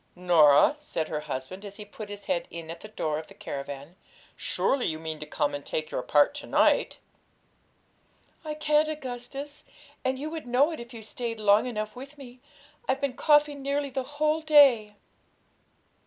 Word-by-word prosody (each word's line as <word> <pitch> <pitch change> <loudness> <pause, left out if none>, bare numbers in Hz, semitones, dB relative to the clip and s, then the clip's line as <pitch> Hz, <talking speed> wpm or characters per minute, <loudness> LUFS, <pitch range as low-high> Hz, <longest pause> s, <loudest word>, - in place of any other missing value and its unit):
'Norah,' 170 - +6
said 165 - -3
her 150 - -2
husband, 150 +5 -6
as 200 -1 -8
he 210 - -8
put 210 0 -9
his 205 -1 -8
head 180 -3 -1
in 165 -1 -7
at 165 - -8
the 215 - -10
door 155 -8 -2
of 160 - -9
the - - -15
caravan, 140 +3 -7 0.4
'surely 270 -2 +1
you 155 - -2
mean 160 -1 -5
to 150 - -7
come 145 - -1
and 145 0 -5
take 155 0 -3
your - - -1
part 145 - +4
to 290 - -7
night?' - - +3 1.5
'I 305 -1 -4
can't, 300 0 +2
Augustus, 275 0 -6 0.4
and 260 0 0
you 300 +3 -5
would 320 -5 -6
know 265 +6 +3
it, 320 - -6
if 235 0 -9
you 230 -3 -9
stayed 230 +1 -5
long 210 +2 +4
enough 215 -3 -4
with 275 +4 -10
me; 255 -2 -12 0.5
I've 265 +1 +2
been 280 -2 0
coughing 295 0 +3
nearly 280 0 -1
the 265 +1 -1 0.2
whole 305 +1 +2
day.' 275 -9 +5
235 Hz, 185 wpm, -27 LUFS, -, 1.5 s, Norah